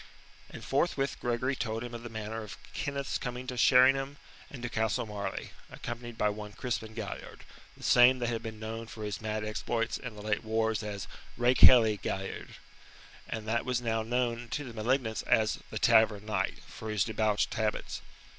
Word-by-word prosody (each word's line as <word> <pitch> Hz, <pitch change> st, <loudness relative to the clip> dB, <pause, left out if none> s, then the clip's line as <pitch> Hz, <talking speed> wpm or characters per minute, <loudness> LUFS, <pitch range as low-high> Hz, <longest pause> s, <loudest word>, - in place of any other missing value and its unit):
And -, -, -9 dB
forthwith 140 Hz, -1 st, 0 dB
Gregory 125 Hz, +3 st, 0 dB
told 115 Hz, -2 st, -2 dB
him 120 Hz, 0 st, -7 dB
of 120 Hz, -, -6 dB
the 120 Hz, -, -7 dB
manner 110 Hz, 0 st, -4 dB
of 105 Hz, -, -8 dB, 0.2 s
Kenneth's 140 Hz, -1 st, -2 dB
coming 125 Hz, 0 st, -4 dB
to 125 Hz, -, -4 dB
Sheringham 135 Hz, +3 st, +5 dB, 0.3 s
and 125 Hz, -4 st, -9 dB
to -, -, -1 dB
Castle 110 Hz, -1 st, 0 dB
Marleigh, 100 Hz, -2 st, -4 dB, 0.2 s
accompanied 120 Hz, -1 st, -7 dB
by 105 Hz, -, +2 dB
one 105 Hz, 0 st, -6 dB
Crispin 115 Hz, -3 st, -3 dB
Galliard, 110 Hz, -4 st, -6 dB, 0.3 s
the -, -, -13 dB
same 125 Hz, +1 st, +7 dB
that 120 Hz, -1 st, -1 dB
had 115 Hz, -2 st, -2 dB
been 110 Hz, -2 st, -7 dB
known 110 Hz, +1 st, -5 dB
for 110 Hz, -1 st, -8 dB
his 105 Hz, -1 st, -4 dB
mad 110 Hz, -1 st, -2 dB
exploits 115 Hz, +2 st, -1 dB
in 125 Hz, -4 st, -7 dB
the 105 Hz, -, -9 dB
late 105 Hz, -1 st, 0 dB
wars 110 Hz, 0 st, +1 dB
as 105 Hz, -2 st, -5 dB, 0.3 s
"rakehelly 120 Hz, -3 st, +7 dB
Galliard," 95 Hz, 0 st, -4 dB, 0.7 s
and 110 Hz, -1 st, -4 dB
that 115 Hz, +2 st, +1 dB
was 125 Hz, -1 st, 0 dB
now 115 Hz, -2 st, 0 dB
known 120 Hz, +1 st, -1 dB
to 145 Hz, -, -2 dB
the 125 Hz, -4 st, -8 dB
malignants 115 Hz, 0 st, 0 dB
as 110 Hz, -1 st, +3 dB
"The 110 Hz, -, -4 dB
Tavern 110 Hz, -2 st, +4 dB
Knight" 100 Hz, -3 st, -1 dB
for 110 Hz, -, -8 dB
his 105 Hz, -3 st, +2 dB
debauched 110 Hz, -1 st, +1 dB
habits. 110 Hz, -1 st, -2 dB
115 Hz, 180 wpm, -31 LUFS, 110-125 Hz, 0.7 s, same